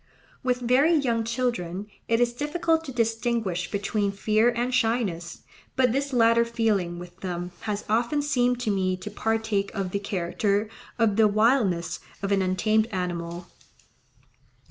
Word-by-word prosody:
With 250 Hz, -1 st, 0 dB
very 265 Hz, +7 st, +4 dB
young 240 Hz, -6 st, +1 dB
children 225 Hz, -6 st, -2 dB, 0.2 s
it 230 Hz, 0 st, +2 dB
is 240 Hz, 0 st, +2 dB
difficult 320 Hz, +4 st, 0 dB
to 270 Hz, -, -6 dB
distinguish 225 Hz, -6 st, -1 dB
between 205 Hz, 0 st, -1 dB
fear 215 Hz, +3 st, +2 dB
and 245 Hz, +1 st, -1 dB
shyness; 220 Hz, -9 st, -1 dB, 0.3 s
but 255 Hz, -2 st, +3 dB
this 275 Hz, +3 st, -1 dB
latter 230 Hz, -1 st, +4 dB
feeling 215 Hz, -7 st, 0 dB
with 175 Hz, 0 st, -11 dB
them 180 Hz, -1 st, -4 dB, 0.2 s
has 205 Hz, 0 st, -2 dB
often 240 Hz, +7 st, +1 dB
seemed 250 Hz, -4 st, +1 dB
to 225 Hz, -4 st, 0 dB
me 185 Hz, -2 st, 0 dB
to 185 Hz, +3 st, -7 dB
partake 220 Hz, -2 st, -1 dB
of 195 Hz, -3 st, -2 dB
the 200 Hz, -, -1 dB
character 200 Hz, +2 st, -1 dB, 0.3 s
of 220 Hz, -3 st, +2 dB
the 220 Hz, -1 st, +6 dB
wildness 210 Hz, -5 st, +2 dB, 0.2 s
of 195 Hz, -, -1 dB
an 195 Hz, -1 st, +3 dB
untamed 215 Hz, +4 st, +2 dB
animal. 175 Hz, -3 st, -4 dB
220 Hz, 145 wpm, -26 LUFS, 190-245 Hz, 0.3 s, the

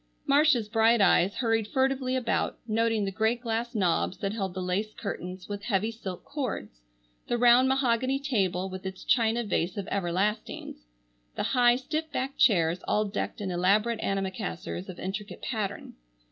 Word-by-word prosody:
Marcia's 280 Hz, -5 st, +4 dB
bright 225 Hz, +2 st, +4 dB
eyes 195 Hz, -1 st, +4 dB
hurried 225 Hz, -3 st, +1 dB
furtively 265 Hz, +1 st, 0 dB
about, 245 Hz, -3 st, 0 dB
noting 225 Hz, -1 st, +1 dB
the 195 Hz, -, -2 dB
great 220 Hz, +4 st, +1 dB
glass 235 Hz, 0 st, -2 dB
knobs 185 Hz, -2 st, +1 dB
that 200 Hz, 0 st, -2 dB
held 195 Hz, -5 st, -3 dB
the -, -, -3 dB
lace 190 Hz, +4 st, -2 dB
curtains 180 Hz, -3 st, -6 dB
with 205 Hz, -1 st, -5 dB
heavy 215 Hz, 0 st, 0 dB
silk 190 Hz, -5 st, -7 dB
cords, 250 Hz, -, -5 dB, 0.5 s
the 240 Hz, -, 0 dB
round 245 Hz, +2 st, +6 dB
mahogany 260 Hz, 0 st, +2 dB
table, 195 Hz, -10 st, 0 dB
with 185 Hz, 0 st, -7 dB
its 190 Hz, 0 st, -6 dB
china 235 Hz, -1 st, +2 dB
vase 180 Hz, -4 st, -1 dB
of 200 Hz, -1 st, -4 dB
"everlastings," 190 Hz, -, -2 dB, 0.5 s
the -, -, -2 dB
high, 245 Hz, -2 st, +5 dB
stiff 305 Hz, +4 st, -3 dB
backed 270 Hz, 0 st, -3 dB
chairs 170 Hz, -5 st, +4 dB
all 215 Hz, -, +2 dB
decked 200 Hz, -, -4 dB
in 190 Hz, -2 st, -2 dB
elaborate 210 Hz, +6 st, +2 dB
antimacassars 95 Hz, -, -3 dB
of 175 Hz, -, -7 dB
intricate 195 Hz, +3 st, -5 dB
pattern. 210 Hz, -5 st, -3 dB
215 Hz, 160 wpm, -28 LUFS, 190-240 Hz, 0.5 s, round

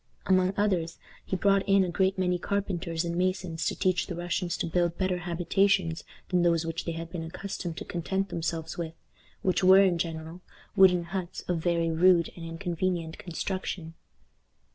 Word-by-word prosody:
Among 185 Hz, 0 st, +3 dB
others, 185 Hz, -5 st, 0 dB, 0.3 s
he -, -, -3 dB
brought 195 Hz, +1 st, +3 dB
in 195 Hz, 0 st, +5 dB
a 180 Hz, -, -1 dB
great 190 Hz, +2 st, +1 dB
many 180 Hz, -1 st, +1 dB
carpenters 175 Hz, -4 st, -2 dB
and 170 Hz, 0 st, -2 dB
masons 180 Hz, -2 st, -1 dB
to -, -, -1 dB
teach 185 Hz, -1 st, +1 dB
the 175 Hz, -, -4 dB
Russians 175 Hz, 0 st, -2 dB
to -, -, -1 dB
build 170 Hz, 0 st, 0 dB
better 185 Hz, -2 st, 0 dB
habitations 175 Hz, 0 st, +1 dB, 0.3 s
than 180 Hz, -1 st, +2 dB
those 170 Hz, -1 st, +2 dB
which 165 Hz, +1 st, -4 dB
they 170 Hz, -, -2 dB
had 165 Hz, 0 st, -6 dB
been 175 Hz, -2 st, -4 dB
accustomed 175 Hz, 0 st, -5 dB
to -, -, -5 dB
content 190 Hz, +3 st, -2 dB
themselves 165 Hz, -1 st, -3 dB
with, 165 Hz, -1 st, -4 dB, 0.5 s
which 185 Hz, 0 st, +1 dB
were, 190 Hz, +1 st, +8 dB
in 180 Hz, -3 st, +2 dB
general, 165 Hz, +1 st, -4 dB, 0.3 s
wooden 180 Hz, -2 st, +6 dB
huts 180 Hz, +1 st, -5 dB
of 175 Hz, -2 st, -2 dB
very 170 Hz, 0 st, +1 dB
rude 170 Hz, 0 st, +4 dB
and 170 Hz, -, -9 dB
inconvenient 170 Hz, 0 st, -3 dB
construction. 175 Hz, -1 st, -4 dB
175 Hz, 170 wpm, -28 LUFS, 165-185 Hz, 0.5 s, were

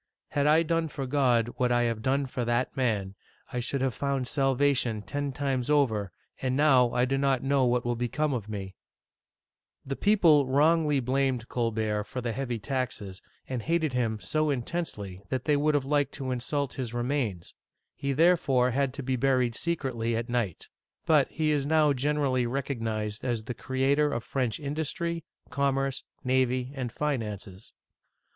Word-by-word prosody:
Had 145 Hz, 0 st, +1 dB
I 155 Hz, +2 st, +5 dB
done 165 Hz, 0 st, 0 dB
for 140 Hz, -2 st, -5 dB
God 125 Hz, -4 st, +2 dB
what 125 Hz, -1 st, +1 dB
I 120 Hz, 0 st, +3 dB
have 115 Hz, -2 st, -1 dB
done 135 Hz, +3 st, +1 dB
for 125 Hz, -1 st, -3 dB
that 120 Hz, +3 st, 0 dB
man, 110 Hz, -8 st, 0 dB, 0.4 s
I 125 Hz, -, -1 dB
should 130 Hz, +3 st, -2 dB
have 130 Hz, -2 st, +1 dB
found 140 Hz, -1 st, -1 dB
salvation 135 Hz, -5 st, +1 dB
ten 140 Hz, +8 st, -3 dB
times 135 Hz, -1 st, -2 dB
over, 110 Hz, -10 st, +2 dB, 0.3 s
and 130 Hz, 0 st, 0 dB
now 130 Hz, -5 st, +5 dB
I 125 Hz, +1 st, +2 dB
do 135 Hz, +1 st, 0 dB
not 135 Hz, -2 st, +1 dB
know 135 Hz, -1 st, +3 dB
what 120 Hz, 0 st, +1 dB
will 120 Hz, 0 st, 0 dB
become 135 Hz, +5 st, -1 dB
of 110 Hz, -4 st, -4 dB
me! 95 Hz, -2 st, -5 dB, 0.6 s
" -, -, -55 dB
The 135 Hz, -, -3 dB
people 165 Hz, -9 st, +4 dB
wrongly 150 Hz, +1 st, +3 dB
blamed 130 Hz, -1 st, 0 dB
Colbert 110 Hz, -3 st, -1 dB
for 125 Hz, -, -5 dB
the 120 Hz, -1 st, -2 dB
heavy 120 Hz, 0 st, -3 dB
taxes, 110 Hz, -4 st, -3 dB, 0.3 s
and 130 Hz, -2 st, -3 dB
hated 160 Hz, +1 st, 0 dB
him^so 125 Hz, +6 st, 0 dB
intensely 120 Hz, -, -4 dB
that 130 Hz, -2 st, -2 dB
they 150 Hz, -, +3 dB
would 150 Hz, +1 st, +2 dB
have 140 Hz, -2 st, +1 dB
liked 145 Hz, -1 st, +1 dB
to 135 Hz, -2 st, -4 dB
insult 135 Hz, +2 st, -2 dB
his 120 Hz, -3 st, -5 dB
remains; 120 Hz, -8 st, -2 dB, 0.4 s
he 140 Hz, -, -3 dB
therefore 140 Hz, -5 st, +3 dB
had 135 Hz, +1 st, 0 dB
to 140 Hz, -, -5 dB
be 130 Hz, +1 st, 0 dB
buried 125 Hz, -1 st, +2 dB
secretly 125 Hz, -7 st, -1 dB
at 115 Hz, +2 st, -3 dB
night. 120 Hz, -8 st, -2 dB, 0.4 s
But 150 Hz, -4 st, +4 dB
he 155 Hz, -1 st, 0 dB
is 145 Hz, -2 st, 0 dB
now 155 Hz, -2 st, +4 dB
generally 135 Hz, -2 st, +1 dB
recognized 115 Hz, -5 st, -3 dB
as 120 Hz, -4 st, -1 dB
the 125 Hz, -, -4 dB
creator 135 Hz, +4 st, +1 dB
of 120 Hz, -4 st, -2 dB
French 125 Hz, -5 st, -1 dB
industry, 160 Hz, +3 st, -3 dB, 0.3 s
commerce, 135 Hz, 0 st, 0 dB, 0.2 s
navy, 130 Hz, 0 st, +1 dB
and 130 Hz, -4 st, -4 dB
finances. 105 Hz, -9 st, -4 dB
130 Hz, 165 wpm, -28 LUFS, 120-145 Hz, 0.6 s, I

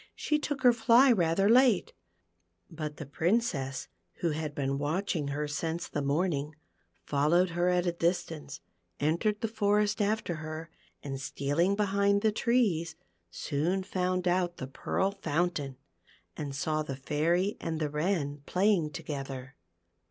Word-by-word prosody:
She 300 Hz, 0 st, 0 dB
took 290 Hz, -2 st, -3 dB
her 245 Hz, -1 st, +7 dB
fl}' 235 Hz, +3 st, +5 dB
rather 175 Hz, +1 st, +2 dB
late; 240 Hz, -3 st, +4 dB, 0.8 s
but 155 Hz, -2 st, -5 dB
the 155 Hz, -, -6 dB
Princess, 145 Hz, -, 0 dB, 0.3 s
who 170 Hz, -, -1 dB
had 150 Hz, -1 st, -4 dB
been 140 Hz, 0 st, -1 dB
watching 155 Hz, +1 st, -1 dB
her 145 Hz, +1 st, -2 dB
since 160 Hz, +3 st, -3 dB
the 145 Hz, -, -3 dB
morning, 150 Hz, 0 st, 0 dB, 0.5 s
followed 160 Hz, -, +2 dB
her 175 Hz, +1 st, +1 dB
at 180 Hz, 0 st, +2 dB
a 175 Hz, -, +2 dB
distance, 165 Hz, -4 st, -2 dB, 0.4 s
entered 170 Hz, +8 st, +1 dB
the 225 Hz, -, 0 dB
forest 210 Hz, -1 st, +1 dB
after 205 Hz, -5 st, 0 dB
her, 155 Hz, +1 st, -7 dB, 0.3 s
and 135 Hz, -2 st, -5 dB
stealing 155 Hz, +8 st, 0 dB
behind 200 Hz, 0 st, +2 dB
the 220 Hz, -, +4 dB
trees, 210 Hz, -8 st, +1 dB, 0.3 s
soon 160 Hz, -, -1 dB
found 185 Hz, -1 st, -1 dB
out 175 Hz, -1 st, +1 dB
the 130 Hz, -, -4 dB
Pearl 190 Hz, +8 st, -1 dB
Fountain, 165 Hz, -6 st, -2 dB, 0.6 s
and 145 Hz, -3 st, -5 dB
saw 155 Hz, +2 st, 0 dB
the 140 Hz, -3 st, -4 dB
Fairy 165 Hz, +8 st, 0 dB
and 160 Hz, -1 st, -3 dB
the 150 Hz, -2 st, -1 dB
Wren 150 Hz, -3 st, -1 dB
playing 185 Hz, -4 st, +2 dB
together. 135 Hz, -2 st, -6 dB
170 Hz, 140 wpm, -30 LUFS, 145-200 Hz, 0.8 s, her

